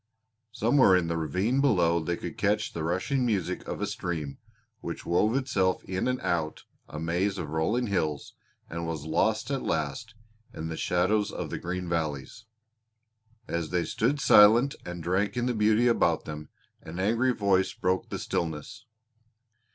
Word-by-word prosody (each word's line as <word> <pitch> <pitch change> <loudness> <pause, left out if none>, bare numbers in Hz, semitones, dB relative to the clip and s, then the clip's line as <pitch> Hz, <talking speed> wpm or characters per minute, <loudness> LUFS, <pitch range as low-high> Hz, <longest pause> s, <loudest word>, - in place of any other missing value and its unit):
Somewhere 115 -3 +4
in 85 -2 +1
the 85 - -1
ravine 95 - 0
below 90 -11 +3
they 85 +1 -2
could 85 - -6
catch 105 +1 0
the 80 - -4
rushing 95 - 0
music 105 -8 -1
of - - -4
a - - +1
stream 80 -6 -4 0.4
which - - -6
wove 105 +7 +2
itself 100 -9 0
in 95 +3 -2
and 125 0 0
out 80 -3 -2 0.3
a 75 - -6
maze 90 +5 0
of 75 -5 -5
rolling 105 +11 0
hills 80 -9 -2 0.3
and 85 0 -5
was 80 -3 -4
lost 110 - 0
at 135 -2 -1
last 80 +9 -3 0.4
in 80 +1 -5
the 80 - -4
shadows 95 +6 +1
of - - -5
the - - -3
green 90 +1 -4
valleys. 80 +5 -3 1.0
As 85 -2 -2
they 90 -1 0
stood 135 +6 0
silent 120 0 +6
and 90 -1 -6
drank 95 +5 0
in 120 - 0
the 125 - 0
beauty 110 +2 +3
about 85 -8 +2
them, 75 -1 -7 0.3
an 85 +3 -8
angry 115 +6 +2
voice 100 -5 +2
broke 90 0 -1
the - - -3
stillness. 85 - -4
95 Hz, 165 wpm, -28 LUFS, 85-110 Hz, 1.0 s, silent